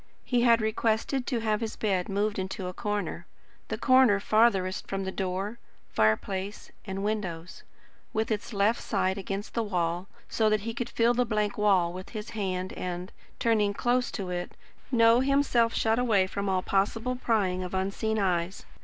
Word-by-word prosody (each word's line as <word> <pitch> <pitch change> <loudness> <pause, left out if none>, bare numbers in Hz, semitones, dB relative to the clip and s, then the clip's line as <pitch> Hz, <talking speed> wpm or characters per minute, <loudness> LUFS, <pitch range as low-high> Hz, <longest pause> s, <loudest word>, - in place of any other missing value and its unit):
He 245 -2 +2
had 235 -1 +5
requested 225 +4 0
to 240 -4 -1
have 215 -1 0
his 225 -1 -3
bed 190 -4 -1
moved 205 +1 0
into 190 0 -4
a 180 - -4
corner 200 -4 -3 0.4
the 220 - -3
corner 255 -4 +5
farthest 205 -3 +2
from 195 0 -2
door, 190 +3 -3 0.3
fireplace, 190 - 0
and 195 -1 -4
windows 185 -5 -3 0.5
with 220 +1 -1
its 215 +2 -2
left 210 +2 +2
side 195 -2 0
against 195 +1 -5
the 230 - 0
wall, 175 -3 -1 0.2
so 220 -1 +2
that 215 -1 +2
he 230 +2 -4
could 240 +1 -4
feel 235 +1 +3
the 250 +1 +2
blank 210 -3 -1
wall 190 -5 +3
with 185 +1 -8
his 210 +1 -6
hand 185 -3 -3
and, 180 0 -5 0.3
turning 210 -3 +2
close 245 +2 +1
to 190 -4 -4
it, 175 0 -4 0.4
know 230 -1 +5
himself 265 -4 +3
shut 225 +1 +2
away 215 -6 +3
from 200 +1 -3
all 185 -1 +1
possible 225 +6 0
prying 205 -7 0
of 180 +1 -5
unseen 200 +3 -1
eyes. 185 -2 -1
205 Hz, 170 wpm, -28 LUFS, 190-230 Hz, 0.5 s, had